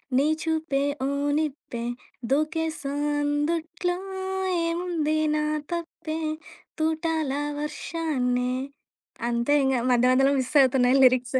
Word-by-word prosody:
నీ 275 +3 +4 0.2
చూపే 320 -4 0 0.2
ఓ - - +1 0.3
నిప్పే, 280 -6 -3 0.5
దూకేసా 310 0 0 0.3
అందుట్లో 320 +4 -1 0.7
ఏముంది 335 -3 0 0.2
నా 300 - +1 0.3
తప్పే? 330 -2 -4 0.6
తూటాల 315 -2 0 0.3
వర్షాన్నే 260 -5 -1 0.8
అంతే 235 +5 +2
ఇంగ. 265 - +2 0.2
మధ్య 250 +1 +4
మధ్యలో 270 +2 +4
మిస్ 255 - -3
అవుతున్నాయి 255 0 +4
లిరిక్స్. 255 0 +4
295 Hz, 95 wpm, -26 LUFS, 260-320 Hz, 0.8 s, నీ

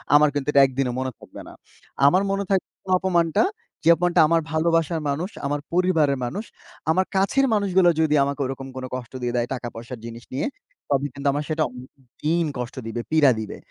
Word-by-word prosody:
আমার 150 0 +6
কিন্তু 145 -1 -3
এটা 140 - +6
১ 135 - -3
দিনও 125 -3 +1
মনে 130 0 -2
থাকবে - - -11
না। - - -11 0.5
আমার 185 +6 +4
মনে 200 0 0
থাকবে 195 -2 +1 0.3
অপমানটা 170 - +2 0.4
যে 165 - +4
অপমানটা 175 -1 +3
আমার 165 0 +3
ভালোবাসার 165 0 +1
মানুষ, 165 +8 -2 0.2
আমার 145 +1 -1
পরিবারের 165 -6 +2
মানুষ, 205 - -4 0.5
আমার 185 +3 +2
কাছের 230 +8 +3
মানুষগুলা 190 -4 +4
যদি 150 -1 +3
আমাকে 140 +1 -2
ওরকম 135 0 -5
কোনো 130 0 -5
কষ্ট 120 -2 -7
দিয়ে 120 0 -2
দেয় 120 0 0
টাকা 120 -2 -5
পয়সার 120 +1 -8
জিনিস 115 0 -8
নিয়ে 135 - -1 0.4
তবে 140 0 +1
কিন্তু 140 0 -4
আমার 145 +1 -1
সেটা 155 0 +1
অনেক 125 +1 -11 0.3
দিন 165 +2 +2
কষ্ট 125 -1 -5
দিবে, 120 +1 -3
পীড়া 150 -4 +5
দিবে। 110 - -6
150 Hz, 195 wpm, -23 LUFS, 130-175 Hz, 0.5 s, আমার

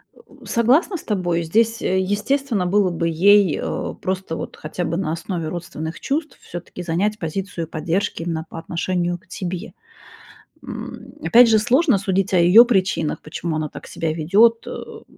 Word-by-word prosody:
Э, - - -20
у - - -18
согласна 265 - +2
с - - -12
тобой. 175 -5 -1
Здесь, 225 +7 +1
э, 190 0 +1
естественно, 210 +2 0
было 195 +1 +2
бы 170 -1 -1
ей, 195 +1 +4
а, - - -3
просто 185 -3 -4
вот - - -6
хотя 155 +4 -5
бы 165 +2 -2
на 185 -5 -1
основе 165 -1 -4
родственных 160 -1 -6
чувств 305 +3 -3
всё-таки 175 +1 -8
занять 195 +6 -1
позицию 170 0 -4
поддержки 165 +2 -2
именно 160 -2 -3
по - - -9
отношению 175 +1 -2
к 185 - -28
тебе, 185 +2 -5 0.9
м. - - -8
Опять 240 0 +6
же, 220 - +5
сложно 255 - +3
судить 195 +1 0
о - - +5
ее 180 +8 +8
причинах, 190 -9 0
почему 155 +1 -4
она 155 -1 -2
так - - -11
себя 160 -1 -3
ведет, 205 +9 +3
а, - - -6
м, - - -9
185 Hz, 175 wpm, -21 LUFS, 165-210 Hz, 0.9 s, ее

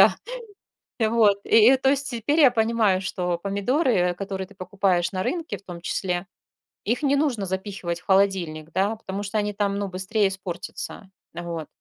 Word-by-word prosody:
да. - - +7 0.8
Вот 220 -3 +3
и 230 +4 +6
то 265 - +2
есть 280 0 0
теперь 245 +6 0
я 275 -4 +8
понимаю, 220 -4 +2
что 180 -2 -2
помидоры, 200 - +1
которые 190 0 -5
ты 205 - -18
покупаешь 185 -2 0
на 185 -1 -1
рынке 330 - -3
в - - -17
том 175 -3 -9
числе, 180 +1 -2 0.6
их 235 +6 0
не 280 0 +3
нужно 265 -9 0
запихивать 190 -2 -3
в 180 - -25
холодильник, 180 -5 +1
да, 195 +6 +1
потому 200 -2 -5
что 205 +2 -3
они 210 0 -1
там, 200 0 -1
ну 200 - -2
быстрее 190 +3 +1
испортятся, 190 +1 -5 0.2
вот. 170 -2 -5
200 Hz, 170 wpm, -24 LUFS, 185-225 Hz, 0.8 s, я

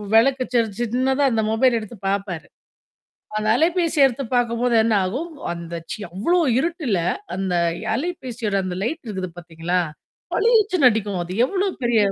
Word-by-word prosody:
விளக்க 260 +3 +4
ச 235 - +5 0.2
சின்னதா 260 +4 +1
அந்த 220 -1 +1
மொபைல் 235 +1 +3
எடுத்து 215 +1 -9
பாப்பாரு. 195 -4 -3 0.9
அந்த 215 0 -1
அலைபேசிய 325 -3 +3
எடுத்து 270 +1 -2
பாக்கும்போது 240 0 +1
என்ன 225 - +2
ஆகும், 265 - -3 0.2
அந்த 170 0 -7 0.4
அவ்ளோ 340 - +2 0.2
இருட்டுல 290 - 0 0.4
அந்த 190 -1 -1 0.4
அலைபேசியோட 245 - -3
அந்த 185 -1 -3
லைட் 310 +9 -3
இருக்குது 190 -4 -4
பாத்தீங்களா? 170 +1 -2 0.5
பளிச்சுன்னு 420 - +4
அடிக்கும். 205 -4 -2
அது 175 - -7
எவ்ளோ 390 +8 0 0.2
பெரிய 235 -2 +3
235 Hz, 135 wpm, -22 LUFS, 195-285 Hz, 0.9 s, ச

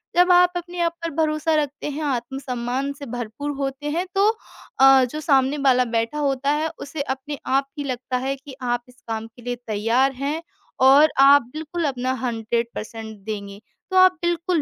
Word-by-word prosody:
जब 360 +1 +5
आप 355 0 +6
अपने 350 0 -6
आप 335 0 +1
पर 335 - -1
भरोसा 315 0 +1
रखते 295 -1 -2
हैं, 295 +2 -5
आत्मसम्मान 255 0 -2
से 280 0 -9
भरपूर 245 +4 -5
होते 275 +1 -3
हैं 345 +4 -1
तो 395 +1 +4 0.5
अ, 270 -1 +7
जो 305 - -4
सामने 275 -1 +2
वाला 255 -1 +5
बैठा 230 +4 -1
होता 275 -1 0
है, 305 +2 0
उसे 285 0 -5
अपने 275 +1 -4
आप 275 +1 +1
ही 290 - -3
लगता 255 -1 -3
है 270 +2 -2
कि 275 0 -12
आप 245 -1 -1
इस 250 -1 -21
काम 225 0 -4
के 230 +2 -18
लिए 245 +1 -3
तैयार 230 +6 +2
हैं 285 +5 -2 0.4
और 285 +4 +7
आप 280 +1 +8
बिल्कुल 320 +2 -3
अपना 255 -2 -1
100 230 0 -1
पर्सेंट 220 0 -7
देंगे। 200 -2 -6 0.3
तो 375 - +2
आप 370 0 +8
बिल्कुल 345 -1 0
275 Hz, 185 wpm, -22 LUFS, 245-300 Hz, 0.5 s, आप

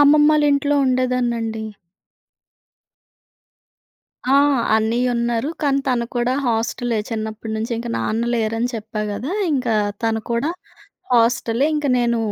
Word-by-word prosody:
అమ్మమ్మాళ్ళింట్లో 290 -1 +4
ఉండేదాన్నండి. 240 -3 0 2.7
ఆ! - - +7 0.4
అన్నయ్య 235 +3 +1
ఉన్నారు. 235 +3 0
కానీ 275 -1 +2
తను 240 -2 +1
కూడా 240 +1 +1
హాస్టలే 230 0 -1
చిన్నప్పటి 220 0 -4
నుంచి. 225 +2 -3
ఇంక 235 0 -5
నాన్న 225 +2 -1
లేరని 225 +1 0
చెప్పా 215 0 -5
కదా! 230 +9 -4 0.2
ఇంకా 250 -5 0 0.3
తను 225 -1 0
కూడా 235 +7 0 0.6
హాస్టలే. 235 +2 +2
ఇంక 295 - -1
నేను 235 -1 +1
235 Hz, 105 wpm, -20 LUFS, 225-255 Hz, 2.7 s, ఆ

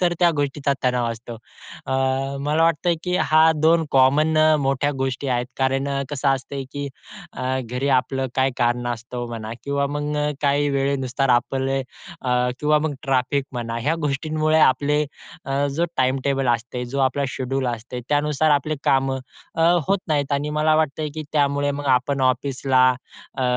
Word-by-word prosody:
तर 175 -1 +2
त्या 175 -1 +5
गोष्टीचा 140 0 0
तणाव 125 -1 +1
असतो. 115 +1 -8 0.5
अ, - - -2 0.5
मला 150 +3 +1
वाटतंय, 165 +1 +2
की 180 0 0
ह्या 160 -1 +4
2 165 0 +4
कॉमन 140 +4 +4 0.2
मोठ्या 135 +1 +1
गोष्टी 135 +1 -2
आहेत, 125 -1 0
कारण 135 +1 +1 0.2
कसं 140 -1 0
असतंय 135 0 -2
की 145 0 -4 0.4
अ, - - -7 0.2
घरी 125 +3 -3
आपलं 135 +1 -2
काही 135 0 +3
कारणास्तव 120 0 -2
म्हणा 115 -1 -6
किंवा 140 0 0
मग 145 +1 -3 0.3
काही 145 0 +2
वेळेनुसार 135 -1 0
आपले 135 +2 -1
अ, 125 -2 -3
किंवा 150 0 +3
मग 150 -1 -2
ट्रॅफिक 135 +1 0
म्हणा 115 -1 -3
या 160 - +3
गोष्टींमुळे 155 +3 0
आपले 150 +1 +3 0.4
अ, 140 +1 0
जो 170 - +2
टाईमटेबल 135 +1 +1
असतंय, 120 +2 -5
जे 135 +3 -5
आपलं 140 +2 -2
शेड्युल 135 0 -2
असतंय 125 +2 -8
त्यानुसार 150 +1 +2
आपली 150 +1 +1
कामं 135 0 +2 0.4
अ, 165 - 0 0.3
होत 200 - +3
नाहीत 145 -2 0
आणि 145 +1 -1
मला 155 0 +3
वाटतंय, 155 0 0
की 155 - -4 0.2
त्यामुळे 145 0 0
मग 145 0 -4
आपण 135 +2 +1
ऑफिसला 130 0 +2 0.6
अ, - - 0
140 Hz, 155 wpm, -22 LUFS, 130-150 Hz, 0.6 s, त्या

